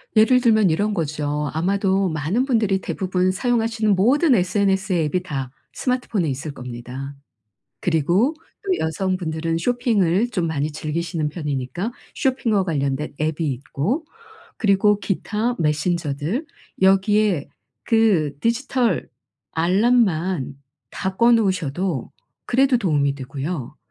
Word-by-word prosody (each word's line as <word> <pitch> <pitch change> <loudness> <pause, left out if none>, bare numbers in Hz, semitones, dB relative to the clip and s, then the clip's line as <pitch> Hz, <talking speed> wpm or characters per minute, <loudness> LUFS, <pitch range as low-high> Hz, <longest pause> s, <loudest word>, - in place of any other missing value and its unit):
예를 240 +4 +5
들면 220 -5 +4
이런 205 +6 0
거죠. 150 -3 -2
아마도 190 +3 +1
많은 160 - 0
분들이 220 -7 +2
대부분 185 -1 0
사용하시는 225 -1 +1
모든 265 - +4
SNS의 190 -2 +1
앱이 180 +5 0
다 135 -7 -4 0.2
스마트폰에 250 -8 -1
있을 140 +3 -4
겁니다. 125 +2 -7 0.7
그리고 175 - +2 0.3
또 380 -2 0
여성분들은 165 -1 -1
쇼핑을 225 -1 +1
좀 180 -7 -1
많이 155 -2 -1
즐기시는 155 +1 -2
편이니까 150 - -3 0.2
쇼핑과 230 -7 +1
관련된 145 -3 -2
앱이 155 +1 -1
있고 160 - -3 0.5
그리고 205 0 +3
기타 215 +4 -1
메신저들 155 - -1 0.3
여기에 195 -3 +3 0.4
그 205 - +3
디지털 245 - 0 0.4
알람만 180 - +2 0.3
다 190 -1 -4
꺼 235 +2 +5
놓으셔도 185 - 0 0.4
그래도 265 +1 +3
도움이 145 -9 +1
되고요. 135 +1 -5
185 Hz, 275 characters per minute, -22 LUFS, 155-220 Hz, 0.7 s, 예를